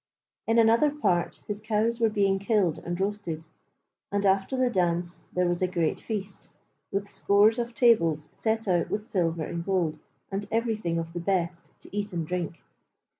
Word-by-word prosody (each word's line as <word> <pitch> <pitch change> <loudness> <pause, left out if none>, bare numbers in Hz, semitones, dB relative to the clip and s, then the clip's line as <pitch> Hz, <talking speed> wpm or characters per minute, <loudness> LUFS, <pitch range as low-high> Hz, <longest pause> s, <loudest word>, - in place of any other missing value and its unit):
In 225 +1 +3
another 230 +6 +5
part 180 -13 0
his 210 0 -3
cows 220 +2 0
were 225 -1 +4
being 200 -2 +2
killed 200 -5 +1
and 175 +1 -4
roasted, 190 -5 -2 0.7
and 200 0 0
after 195 +6 +2
the 255 0 +3
dance 175 -3 -1
there 180 0 +1
was 175 0 0
a 185 - +3
great 170 -3 0
feast, 210 -3 -5 0.4
with 200 0 -1
scores 205 +3 +3
of 235 0 -3
tables 165 - +3
set 220 -1 -1
out 175 -3 +2
with 210 +1 -2
silver 170 -7 0
and 170 +2 -4
gold 170 -5 0 0.3
and 195 +1 -3
everything 220 -7 0
of 165 0 -4
the 175 - -3
best 170 -1 -1
to - - -12
eat 205 -1 -2
and 165 -2 -2
drink. 170 -2 -4
195 Hz, 175 wpm, -27 LUFS, 170-220 Hz, 0.7 s, another